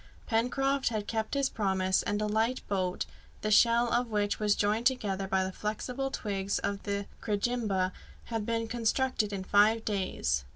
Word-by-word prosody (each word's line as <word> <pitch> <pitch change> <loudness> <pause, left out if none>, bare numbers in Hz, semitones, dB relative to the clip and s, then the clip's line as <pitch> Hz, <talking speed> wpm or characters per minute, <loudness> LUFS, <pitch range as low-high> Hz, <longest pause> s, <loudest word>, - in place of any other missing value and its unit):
Pencroft 270 +4 +1
had 215 -3 -2
kept 220 +3 -2
his 275 -1 +2
promise, 190 -5 +1
and 205 - -1
a - - +1
light 225 +4 0
boat, 185 -2 -1 0.4
the 215 - -1
shell 235 +2 +5
of 240 0 +1
which 205 -1 0
was 210 -1 +3
joined 215 +3 +2
together 200 -7 -1
by 190 0 +1
the 190 - -3
flexible 245 +7 -3
twigs 200 -5 -2
of 200 0 -2
the 200 -1 -2 0.2
crejimba, 205 -3 0 0.3
had 225 -2 -3
been 230 +1 -1
constructed 235 -1 0
in 195 -2 -3
five 210 +3 +4
days. 185 - 0
215 Hz, 165 wpm, -30 LUFS, 200-235 Hz, 0.4 s, shell